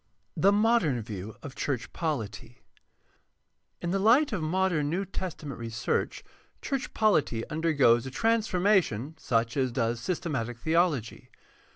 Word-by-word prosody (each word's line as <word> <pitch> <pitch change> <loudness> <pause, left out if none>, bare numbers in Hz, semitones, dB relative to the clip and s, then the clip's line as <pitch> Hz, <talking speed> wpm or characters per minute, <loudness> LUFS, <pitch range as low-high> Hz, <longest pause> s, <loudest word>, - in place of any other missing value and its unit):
3. - - -6
THE 200 - +6
MODERN 205 - +2
VIEW 105 0 -7
OF 140 - -7
CHURCH 130 -4 -3
POLITY 120 - -4 1.3
In 170 - -1
the 195 - +1
light 245 +9 +4
of 190 - -1
modem 160 -2 +1
New 185 +5 -1
Testament 160 -9 -6
research 115 0 -2 0.4
church 275 -2 -3
polity 155 - +2
undergoes 140 -7 +3
a - - -4
transformation 185 - +1
such 115 0 0
as 130 -3 +1
does 115 0 -1
systematic 135 -7 -3
theology. 160 -3 0
150 Hz, 130 wpm, -28 LUFS, 120-190 Hz, 1.3 s, THE